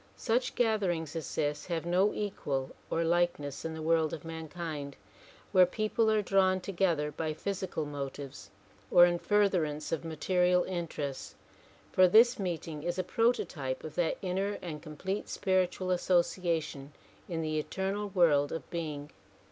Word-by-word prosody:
Such 245 +2 0
gatherings 190 - 0
as 165 - -5
this 145 0 -1
have 170 -2 -2
no 185 +4 +3
equal 140 -10 -3 0.2
or 165 - +1
likeness 165 -4 0
m 160 0 -4
the 160 - -6
world 160 -1 +2
of 155 - -6
mankind 160 -3 -5 0.6
where 185 -1 +6
people 215 +3 +1
are 215 -1 +2
drawn 190 -1 +3
together 170 -5 0
by 155 0 -3
physical 190 -4 -3
motives 140 -1 -6 0.4
or 175 - +8
in 175 0 +1
furtherance 180 -8 +1
of 165 - -1
material 180 +2 +2
interests, 160 -6 -4 0.6
for 185 0 +6
this 235 +6 +6
meeting 165 -5 -3
is 175 +3 -2
a 185 - 0
prototype 180 - 0
of 155 - -7
that 175 -2 0
inner 195 +2 -1
and 155 -4 -5
complete 190 +7 -4
spiritual 185 -1 0
association 170 -5 0 0.4
in 165 -2 -2
the 155 0 -1
eternal 195 +6 -2
world 160 -7 +3
of 165 - -5
being. 150 -4 -4
175 Hz, 145 wpm, -31 LUFS, 155-190 Hz, 0.6 s, or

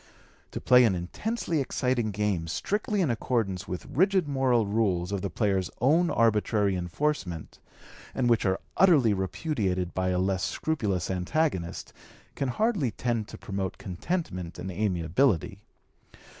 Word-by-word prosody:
To - - -5
play 125 0 +6
an 100 -5 +2
intensely 165 - -2
exciting 125 -3 0
game 100 -5 -1
strictly 205 - -1
in 155 -8 +2
accordance 110 -5 -1
with 90 - -5
rigid 180 +5 +2
moral 130 -5 +2
rules 100 -4 0
of 100 -2 -2
the 100 - -2
player's 95 -4 0
own 160 +8 +3
arbitrary 105 -3 +2
enforcement, 90 - -3 0.6
and 130 -2 +1
which 115 -2 +3
are 95 -1 +1 0.2
utterly 150 - +5
repudiated 95 - -2
by 95 0 0
a 90 - +1
less 95 0 0
scrupulous 100 - -1
antagonist, 90 - -1 0.4
can 135 - -2
hardly 200 - +1
tend 115 0 -2
to - - -9
promote 95 -2 -4
contentment 90 - -4
and 90 +2 -5
amiability. 95 - 0
105 Hz, 135 wpm, -27 LUFS, 95-135 Hz, 0.6 s, play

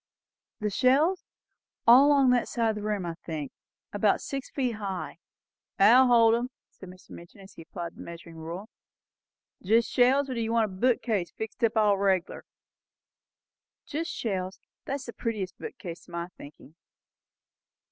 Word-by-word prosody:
"The 210 -1 -1
shelves? 285 - +2 0.6
All 250 +5 +8
along 275 -3 +5
that 245 -1 +2
side 230 -2 0
of 220 - -1
the 210 - -5
room, 205 -3 -2
I 170 - -3
think. 155 -4 -5 0.4
And - - -4
about - - +3
six 275 -2 -5
feet 250 -5 -2
high." 185 -7 -5 0.6
"That'll 240 +6 +7
hold 230 -2 +5
'em," 240 +2 0 0.2
said 190 - -13
Mr. 185 +1 -16
Midgin, 170 +3 -12
as 195 0 -14
he - - -12
applied 170 +1 -7
his - - -20
measuring 170 -1 -10
rule. 170 +6 -7 0.9
"Jest 225 +4 +2
shelves? 265 +3 +3
or 260 - -4
do 235 - -2
you 225 0 -2
want 230 -1 +3
a 200 - -7
bookcase 225 -4 0
fixed 220 +1 -7
up 225 0 +2
all 205 -2 +3
reg'lar?" 190 -3 0 1.4
"Just 325 +3 -4
shelves. 190 - -3 0.3
That 275 - -2
is 280 - -7
the 235 - -8
prettiest 210 -5 -4
bookcase, 170 -1 -8
to - - -17
my 170 +1 -4
thinking." 145 +1 -14
215 Hz, 165 wpm, -27 LUFS, 185-245 Hz, 1.4 s, All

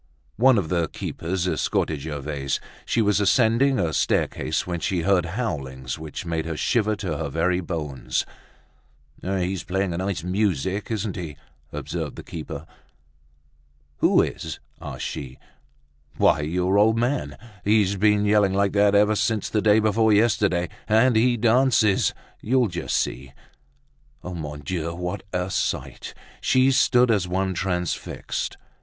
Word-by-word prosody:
One 130 +2 +5
of 90 -6 -1
the 85 -2 +1
keepers 90 +4 -3
escorted 80 -4 0
Gervaise. 70 -2 -3 0.3
She 115 - +2
was 105 -1 +2
ascending 120 +5 +3
a 85 -4 0
staircase, - - 0
when 85 -1 -3
she 90 0 -1
heard 90 -2 +2
howlings 70 - -4
which 80 +1 -7
made 80 -1 -2
her 80 -2 -3
shiver 110 +2 +1
to 90 -7 -4
her 80 -3 -2
very 85 +4 +1
bones. 80 -6 -3 1.0
"He's 95 -1 -2
playing 95 0 -1
a - - -3
nice 95 -3 -2
music, 95 0 -1
isn't 105 -3 -2
he?" 80 -6 -6 0.3
observed - - -4
the - - -9
keeper. 80 -2 -7 1.3
"Who - - +4
is?" - - -5 0.2
asked - - -6
she. 65 -2 -6 0.8
"Why, - - +4
your 90 +6 +1
old 110 +2 +4
man! 125 +4 -1 0.3
He's 105 -1 +3
been 105 +1 +3
yelling 105 -2 +3
like 100 0 +2
that 100 0 +3
ever 105 +1 +4
since 110 0 0
the 105 - 0
day 105 +1 +5
before 110 0 +3
yesterday; 105 -5 +2 0.2
and 115 +3 +4
he 120 +2 +3
dances, 115 -3 +3 0.3
you'll 125 0 +2
just 85 - -2
see." 65 +1 -3 0.9
Mon 75 -5 -6
Dieu! 85 +2 -3
what 90 0 -4
a 90 +1 -2
sight! - - -3 0.3
She 130 +1 +4
stood 125 -2 +4
as 100 -5 +1
one 95 +1 -1
transfixed. 90 -2 -3
95 Hz, 140 wpm, -24 LUFS, 85-110 Hz, 1.3 s, One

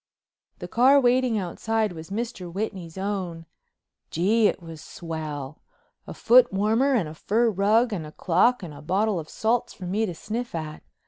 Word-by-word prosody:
The - - -7
car 265 +4 +5
waiting 250 -2 +2
outside 215 +3 -1
was 160 -1 -9
Mr. 205 -4 -4
Whitney's 190 -3 -5
own. 190 -4 -4 0.6
Gee, 210 +6 +3
it - - -1
was 165 -3 -10
swell! 155 -4 -6 0.5
A - - -6
footwarmer 235 +2 +4
and 195 -10 +1
a 155 - -8
fur 225 +8 +1
rug 215 +4 +2
and 165 -6 -4
a - - -11
clock 190 +9 +2
and 165 -4 -7
a 145 - -11
bottle 195 +4 0
of 155 - -8
salts 230 +2 0
for 185 - -8
me 210 +5 0
to 175 - -5
sniff 230 +5 -5
at. 155 -1 -5
200 Hz, 170 wpm, -25 LUFS, 165-230 Hz, 0.6 s, car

